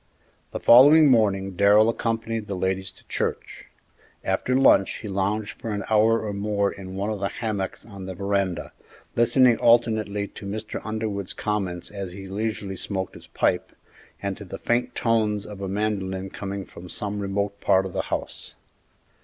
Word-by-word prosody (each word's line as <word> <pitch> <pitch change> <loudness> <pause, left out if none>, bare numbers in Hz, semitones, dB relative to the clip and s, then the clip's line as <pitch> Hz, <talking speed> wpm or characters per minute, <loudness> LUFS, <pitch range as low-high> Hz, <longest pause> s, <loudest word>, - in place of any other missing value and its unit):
The - - -5
following 145 +4 +8
morning 100 -5 +2
Darrell 100 +4 +5
accompanied 115 -1 -2
the 100 - -3
ladies 95 +1 -1
to - - -20
church. - - -3 0.6
After 130 - 0
lunch 100 -7 +5
he 110 - -6
lounged 100 +2 -2
for 115 - -4
an 100 -1 -2
hour 110 +1 +4
or 105 - -3
more 100 0 0
in 95 -1 -9
one 100 +3 -2
of 105 - -3
the 100 - 0
hammocks 100 -3 -4
on 100 -4 -9
the 95 - -5
veranda, 100 -2 -1 0.4
listening 120 0 +5
alternately 110 -3 +3
to 100 - -9
Mr. 110 +2 -5
Underwood's 110 -3 -3
comments 95 -5 -3
as 100 -3 -6
he 95 +1 -8
leisurely 100 -1 -3
smoked 95 -1 -4
his - - -13
pipe, - - 0 0.5
and 100 -1 -2
to - - -8
the 90 - -7
faint 120 +1 0
tones 110 -3 +1
of 100 -2 -9
a 95 - -3
mandolin 95 -2 -2
coming 100 -1 -5
from 90 +1 -12
some 105 +2 -3
remote 100 0 -2
part 95 0 +3
of 95 - -6
the - - 0
house. - - -4
100 Hz, 170 wpm, -25 LUFS, 95-110 Hz, 0.6 s, following